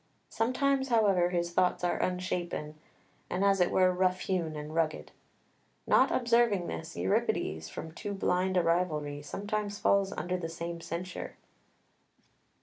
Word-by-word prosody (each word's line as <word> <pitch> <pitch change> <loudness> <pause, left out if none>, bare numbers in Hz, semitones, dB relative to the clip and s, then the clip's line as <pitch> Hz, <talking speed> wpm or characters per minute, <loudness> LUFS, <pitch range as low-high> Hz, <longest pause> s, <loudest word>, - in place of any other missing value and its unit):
Sometimes, 265 +3 +1
however, 200 -7 +3
his 175 -1 -1
thoughts 180 0 +2
are 175 - 0
unshapen, 180 -4 -2 0.6
and 190 +2 0
as 195 -1 +3
it 175 - +4
were 185 -1 +3
rough 185 0 +1
hewn 170 -5 -1
and 150 +1 -6
rugged. 160 -1 -1 0.7
Not - - +5
observing 235 -6 +2
this, 160 -1 -6
Euripides, 80 -3 0
from 160 - -7
too 200 +5 -5
blind 185 0 +1
a 180 - +4
rivalry, 155 -4 0
sometimes 205 +5 -3
falls 200 -1 +2
under 180 +3 -2
the 165 -2 -4
same 170 0 -5
censure. 175 +3 -5
180 Hz, 140 wpm, -30 LUFS, 165-195 Hz, 0.7 s, Not